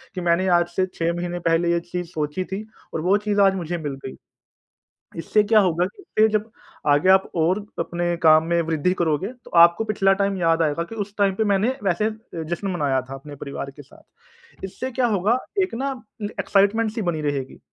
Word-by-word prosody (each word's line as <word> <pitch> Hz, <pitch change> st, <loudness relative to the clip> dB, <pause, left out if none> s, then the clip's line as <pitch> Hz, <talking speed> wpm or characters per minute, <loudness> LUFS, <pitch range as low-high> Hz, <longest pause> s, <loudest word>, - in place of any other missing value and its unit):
कि 180 Hz, -, -3 dB
मैंने 175 Hz, +2 st, +2 dB
आज 175 Hz, -, 0 dB
से 185 Hz, -, +2 dB
6 165 Hz, 0 st, -1 dB
महीने 175 Hz, 0 st, -3 dB
पहले 170 Hz, +1 st, +2 dB
ये 170 Hz, -, +2 dB
चीज़ 180 Hz, -1 st, -3 dB
सोची 150 Hz, +4 st, -2 dB
थी 200 Hz, +3 st, -5 dB, 0.3 s
और 160 Hz, -, -2 dB
वो 190 Hz, +5 st, +3 dB
चीज़ 205 Hz, -1 st, +2 dB
आज 195 Hz, -1 st, +5 dB
मुझे 175 Hz, -1 st, -3 dB
मिल 145 Hz, -4 st, -4 dB
गई। 130 Hz, -, -6 dB, 1.0 s
इससे 210 Hz, +6 st, +2 dB
क्या 215 Hz, +1 st, +4 dB
होगा 175 Hz, -1 st, +1 dB
कि 220 Hz, -, +2 dB
जब 215 Hz, +1 st, -1 dB, 0.4 s
आगे 145 Hz, +6 st, +3 dB
आप 190 Hz, 0 st, +5 dB
और 170 Hz, +5 st, +2 dB, 0.2 s
अपने 175 Hz, +1 st, -1 dB
काम 155 Hz, 0 st, +7 dB
में 170 Hz, 0 st, +2 dB
वृद्धि 160 Hz, +2 st, 0 dB
करोगे 165 Hz, +2 st, +1 dB, 0.2 s
तो -, -, -14 dB
आपको 170 Hz, +5 st, +6 dB
पिछला 195 Hz, -2 st, +2 dB
टाइम 200 Hz, -1 st, 0 dB
याद 165 Hz, -1 st, +2 dB
आएगा 155 Hz, +1 st, 0 dB
कि 225 Hz, -, -7 dB
उस 200 Hz, +1 st, -17 dB
टाइम 200 Hz, -2 st, +3 dB
पे 220 Hz, -, +1 dB
मैंने 200 Hz, +5 st, +2 dB
वैसे 200 Hz, +4 st, +1 dB, 0.4 s
जश्न 180 Hz, +4 st, -3 dB
मनाया 145 Hz, -6 st, 0 dB
था -, -, -6 dB
अपने 145 Hz, +2 st, -10 dB
परिवार 140 Hz, 0 st, -6 dB
के 145 Hz, -, -13 dB
साथ। 140 Hz, -, -19 dB, 0.6 s
इससे 255 Hz, +7 st, -6 dB
क्या 245 Hz, 0 st, +1 dB
होगा 210 Hz, +3 st, +2 dB, 0.3 s
एक 370 Hz, -, -4 dB
ना 270 Hz, +3 st, -2 dB, 0.5 s
एक्साइटमेंट 210 Hz, +3 st, +2 dB
सी 225 Hz, -, -4 dB
बनी 170 Hz, -5 st, -1 dB
रहेगी। 140 Hz, -3 st, -3 dB
175 Hz, 200 wpm, -23 LUFS, 165-200 Hz, 1.0 s, काम